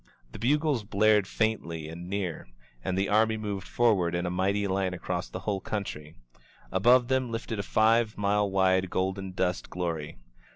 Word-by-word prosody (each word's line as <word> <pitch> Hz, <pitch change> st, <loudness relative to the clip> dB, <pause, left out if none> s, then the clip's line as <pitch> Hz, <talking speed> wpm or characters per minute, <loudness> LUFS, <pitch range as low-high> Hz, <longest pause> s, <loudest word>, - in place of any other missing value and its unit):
The -, -, -9 dB
bugles 145 Hz, +1 st, +1 dB
blared 105 Hz, -1 st, +3 dB
faintly 85 Hz, -9 st, -1 dB
and 85 Hz, +2 st, -8 dB
near, 95 Hz, -4 st, -3 dB, 0.4 s
and 95 Hz, -, -1 dB
the 95 Hz, +1 st, +1 dB
army 110 Hz, +1 st, +3 dB
moved 100 Hz, -3 st, -4 dB
for 120 Hz, -2 st, +3 dB
ward 85 Hz, -3 st, 0 dB
in 85 Hz, +1 st, -1 dB
a 90 Hz, -, -1 dB
mighty 100 Hz, +3 st, 0 dB
line 95 Hz, -1 st, -1 dB
across 90 Hz, 0 st, -4 dB
the 90 Hz, -, -6 dB
whole 100 Hz, -1 st, -2 dB
country. 80 Hz, -8 st, -5 dB, 0.6 s
Above 120 Hz, +6 st, +4 dB
them 130 Hz, -1 st, +1 dB
lifted 115 Hz, -1 st, -4 dB
a -, -, +1 dB
five 110 Hz, +2 st, +2 dB
mile 105 Hz, 0 st, +1 dB
wide 95 Hz, -1 st, +2 dB
golden 95 Hz, +1 st, -2 dB
dust 90 Hz, 0 st, -1 dB
glory. 85 Hz, -4 st, -4 dB
100 Hz, 170 wpm, -28 LUFS, 90-110 Hz, 0.6 s, Above